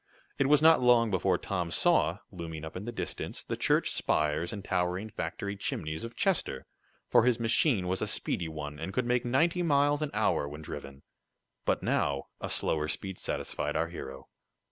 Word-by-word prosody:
It 135 - +3
was 150 +1 +5
not 160 -3 +7
long 120 -3 +5
before 95 -1 +2
Tom 90 -3 -2
saw, 90 - +3
looming 80 -4 -6
up 80 - -8
in 95 +3 -5
the 120 - -3
distance 120 - -5
the - - -3
church - - +2
spires 75 +3 0
and 100 -2 -6
towering 90 +4 -1
factory 100 +5 -4
chimneys 80 -5 -3
of 115 0 -7
Chester, 175 - 0 0.4
for - - +5
his 125 -1 +3
machine 115 - +2
was 95 +1 -1
a - - 0
speedy 85 -2 -2
one, 75 -1 -6
and 90 +5 -5
could 125 - +1
make 125 0 +1
ninety 165 +9 +2
miles 145 -2 +3
an 150 - -1
hour 70 - +1
when 75 +2 -8
driven. 70 -2 -8 0.6
But - - +1
now 70 -1 0
a - - -4
slower 75 -1 0
speed 95 +4 -4
satisfied 75 0 -3
our 80 +1 0
hero. 65 -5 -8
95 Hz, 185 wpm, -30 LUFS, 80-125 Hz, 0.6 s, not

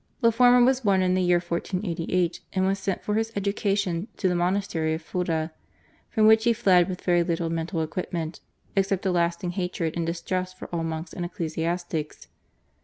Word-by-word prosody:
The 230 -1 +5
former 245 +1 +6
was 260 0 +2
born 195 -4 +3
in 180 0 +2
the 185 - +2
year 180 -1 +4
1488 175 0 -1
and 190 -1 +1
was 195 +1 +1
sent 195 -1 -2
for 210 - -1
his 225 +1 0
education 200 -2 0
to 190 - +1
the 180 - +2
monastery 175 -3 0
of 160 - -8
Fulda, 165 -2 -2 0.6
from 220 -3 +2
which 220 0 +6
he 235 - +5
fled 190 -5 +4
with 180 - -5
very 175 -1 +3
little 170 -1 -1
mental 165 0 -2
equipment 165 0 -4 0.4
except 195 0 +1
a 190 - +2
lasting 170 0 0
hatred 180 -3 -2
and 170 - -1
distrust 185 +2 -3
for - - -8
all 165 -1 -1
monks 160 +1 -4
and 180 - -4
ecclesiastics. 170 -2 -3
180 Hz, 180 wpm, -26 LUFS, 170-195 Hz, 0.6 s, former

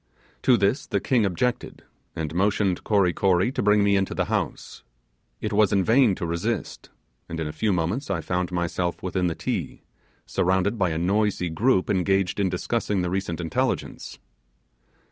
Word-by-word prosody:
To 125 - +4
this 100 +8 0
the - - 0
king 120 -6 +2
objected, 115 +7 -2 0.3
and 80 -1 -4
motioned 95 0 +1
Kory 100 -5 +2
Kory 95 +5 +2
to - - -2
bring 105 0 +4
me 100 0 +3
into 95 -1 0
the - - 0
house. - - -3 0.6
It - - -3
was 105 -1 +4
in 100 -2 +3
vain 115 -1 +4
to 90 - -4
resist; 85 0 -3 0.4
and 80 - -5
in 80 - -2
a 75 - -5
few 105 +7 0
moments 90 - -1
I 95 -4 0
found 90 +2 -2
myself 85 0 -2
within 90 -1 0
the 85 - -2
Ti, - - -4 0.4
surrounded 95 +4 0
by 90 -2 +2
a 80 - -2
noisy 95 +1 0
group 100 +3 +2
engaged 95 0 +1
in 95 -2 +2
discussing 100 +1 -1
the 90 - -2
recent 95 -3 -2
intelligence. 80 -2 -2
95 Hz, 170 wpm, -25 LUFS, 90-105 Hz, 0.6 s, To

